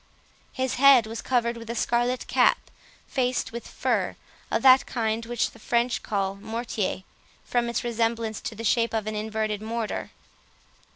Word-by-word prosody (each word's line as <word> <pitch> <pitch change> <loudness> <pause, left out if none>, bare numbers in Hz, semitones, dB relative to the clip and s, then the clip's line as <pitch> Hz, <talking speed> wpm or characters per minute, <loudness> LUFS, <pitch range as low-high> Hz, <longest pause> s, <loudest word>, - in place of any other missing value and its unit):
His 260 -1 -1
head 275 -4 +8
was 225 +1 -6
covered 235 -2 0
with 230 -1 -10
a 235 - -3
scarlet 240 +2 0
cap, - - +2 0.3
faced 250 -2 -1
with 235 +1 -7
fur—of - - -3
that 260 0 +7
kind 225 -1 -1
which 240 -1 0
the 225 - -17
French 235 +2 0
call 195 -2 -1
"mortier", 220 -3 -3 0.4
from 240 -1 0
its 235 - -2
resemblance 230 -2 -1
to 225 - -5
the 225 - -7
shape 230 +1 +2
of 220 -2 -1
an 215 - -3
inverted 215 -1 -2
mortar. 225 0 -3
230 Hz, 155 wpm, -26 LUFS, 220-240 Hz, 0.4 s, head